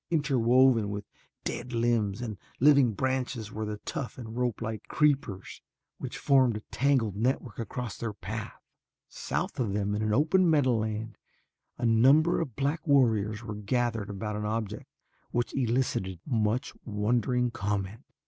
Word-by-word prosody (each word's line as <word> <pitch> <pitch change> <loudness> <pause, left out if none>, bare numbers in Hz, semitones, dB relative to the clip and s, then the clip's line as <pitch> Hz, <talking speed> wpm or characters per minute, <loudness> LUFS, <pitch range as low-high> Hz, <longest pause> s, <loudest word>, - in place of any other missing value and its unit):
Interwoven 130 -6 +3
with 100 0 -4 0.4
dead 125 - -4
limbs 115 -2 +1
and 110 -4 -5 0.2
living 140 -4 +5
branches 125 -2 -2
were 110 +1 -4
the 105 0 -4
tough 135 -10 -4
and 115 -3 -8
ropelike 115 -3 -2
creepers 140 -11 0 0.4
which - - -5
formed 130 -5 +3
a - - -8
tangled 130 -7 +2
network 120 0 -1
across 115 -1 -5
their 115 -2 -2
path. 105 +2 -6 0.5
South - - -3
of 110 -6 0
them 105 0 0
in 105 - -1
an 110 0 0
open 165 - +3
meadowland 115 -7 +1 0.6
a - - -2
number 135 +10 +5
of 135 -9 -5
black 145 +4 -1
warriors 110 -6 +3
were 110 - -5
gathered 110 0 -1
about 105 +1 -4
an 105 - -3
object 105 -1 -3 0.4
which 120 0 -1
elicited 120 -8 0
much 115 -1 0
wondering 120 +3 0
comment. 100 +1 -3
115 Hz, 140 wpm, -29 LUFS, 105-130 Hz, 0.6 s, living